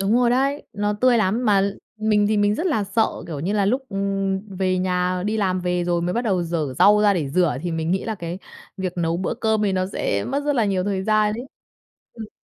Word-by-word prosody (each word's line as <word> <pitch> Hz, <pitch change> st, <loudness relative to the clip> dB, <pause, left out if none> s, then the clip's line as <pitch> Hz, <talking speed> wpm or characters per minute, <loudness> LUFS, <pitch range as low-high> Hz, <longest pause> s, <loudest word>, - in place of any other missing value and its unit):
Đúng 195 Hz, +2 st, +1 dB
rồi 245 Hz, -1 st, +3 dB
đấy, 275 Hz, +3 st, +1 dB
nó 205 Hz, 0 st, -1 dB
tươi 250 Hz, -2 st, +4 dB
lắm 215 Hz, +4 st, +1 dB
mà 205 Hz, -3 st, +4 dB
l 200 Hz, +1 st, 0 dB, 0.3 s
mình 210 Hz, -1 st, +3 dB
thì 215 Hz, +1 st, +1 dB
mình 205 Hz, 0 st, +2 dB
rất 330 Hz, -, -2 dB
là 220 Hz, -, +1 dB
sợ, 220 Hz, +3 st, +2 dB, 0.2 s
kiểu 150 Hz, -4 st, -5 dB
như 185 Hz, +6 st, -1 dB
là, 205 Hz, -2 st, +1 dB
lúc, 255 Hz, +6 st, +1 dB
ừm, 195 Hz, -1 st, -1 dB, 0.2 s
về 185 Hz, -1 st, +1 dB
nhà 180 Hz, 0 st, 0 dB
đi 215 Hz, +1 st, 0 dB
làm 185 Hz, -3 st, 0 dB
về 180 Hz, -1 st, -1 dB
rồi 175 Hz, -1 st, 0 dB
mới 180 Hz, +1 st, -1 dB
bắt 240 Hz, -, -1 dB
đầu 195 Hz, -7 st, 0 dB
giở 160 Hz, -6 st, -2 dB
rau 210 Hz, +1 st, +6 dB
ra 205 Hz, -1 st, +4 dB
để 155 Hz, -7 st, -1 dB
rửa 160 Hz, -4 st, +2 dB
thì 175 Hz, -, -2 dB
mình 160 Hz, +1 st, -2 dB
nghĩ 190 Hz, -, 0 dB
là 220 Hz, -, -2 dB
cái 175 Hz, -2 st, -6 dB, 0.4 s
việc 190 Hz, -2 st, -3 dB
nấu 165 Hz, 0 st, 0 dB
bữa 180 Hz, +1 st, -2 dB
cơm 220 Hz, -2 st, 0 dB
thì 200 Hz, -, +1 dB
nó 185 Hz, 0 st, 0 dB
sẽ 100 Hz, -, -2 dB
mất 285 Hz, +1 st, -2 dB
rất 290 Hz, -, +1 dB
là 235 Hz, -4 st, +2 dB
nhiều 190 Hz, -2 st, 0 dB
thời 195 Hz, -2 st, -1 dB
gian 215 Hz, 0 st, +2 dB
ấy. 240 Hz, +5 st, -6 dB, 0.7 s
Ừm. 220 Hz, -2 st, -9 dB
195 Hz, 255 wpm, -22 LUFS, 180-215 Hz, 0.7 s, rau